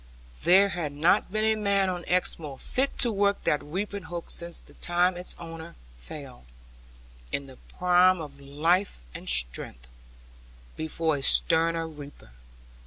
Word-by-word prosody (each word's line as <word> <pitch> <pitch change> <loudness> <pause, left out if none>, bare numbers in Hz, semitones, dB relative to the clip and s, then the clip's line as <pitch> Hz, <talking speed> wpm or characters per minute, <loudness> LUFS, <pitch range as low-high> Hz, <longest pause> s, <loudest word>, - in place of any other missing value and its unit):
There 195 +3 +6
had 165 -6 -4
not 160 +5 +2
been 215 +1 0
a 220 - +4
man 200 -2 +1
on 180 -2 -3
Exmoor 160 -6 +1
fit 265 - -2
to 240 - +3
work 200 -1 +1
that 150 - +1
reaping 200 +6 -4
hook 170 +1 -5
since 170 0 -2
the - - -15
time 175 +1 +1
its 180 +1 -3
owner 165 0 -9 0.2
fell, 125 - -10 0.9
in 140 - -2
the 130 -2 -14 0.2
prime 180 0 +4
of 145 -3 -8
life 155 - 0
and - - -6
strength, - - +2 0.9
before 160 -1 -1
a - - -6
sterner 165 - +2
reaper. 145 - -12
165 Hz, 145 wpm, -27 LUFS, 145-185 Hz, 0.9 s, There